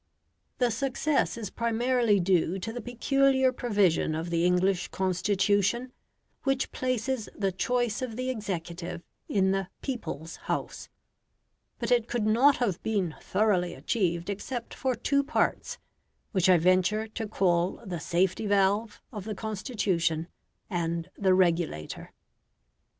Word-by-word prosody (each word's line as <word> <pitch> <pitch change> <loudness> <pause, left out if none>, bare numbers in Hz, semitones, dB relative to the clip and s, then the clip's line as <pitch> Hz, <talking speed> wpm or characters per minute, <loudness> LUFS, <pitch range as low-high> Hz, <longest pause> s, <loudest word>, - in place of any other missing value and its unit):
The 245 -2 +2
success 275 +3 0
is 215 -4 -5
primarily 235 -2 +2
due 180 0 +2
to 225 +4 -5
the 245 - -5
peculiar 265 +3 +2
provision 200 -10 +1
of 165 +2 -4
the 170 0 +2
English 180 +1 +2
Constitution, 200 +5 +1 0.5
which 270 -1 0
places 255 -2 -2
the 195 -2 0
choice 240 +4 0
of 245 -4 -4
the 255 +2 -1
executive 175 -5 -5 0.3
in 190 -2 +2
the 195 -1 -1 0.2
"people's 165 - -5
House"; - - -4 0.9
but - - -3
it 240 -2 +3
could 240 -3 -1
not 250 +6 +5
have 205 -8 -1
been 195 -7 -1
thoroughly 185 -3 +1
achieved 175 -6 -1
except 235 +4 -5
for 260 -2 -1
two 280 +4 +1
parts, 295 +2 0 0.5
which 185 -3 +2
I 180 - +7
venture 185 +5 +2
to 220 0 -4
call 180 -3 +1
the 180 -4 -4
"safety 185 +6 0
valve" 205 +2 +2
of 205 -3 -6
the 215 -1 -4
Constitution, 190 - -1 0.4
and 170 -3 -2
the 190 -2 +3
"regulator". 170 - 0
205 Hz, 130 wpm, -28 LUFS, 180-240 Hz, 0.9 s, I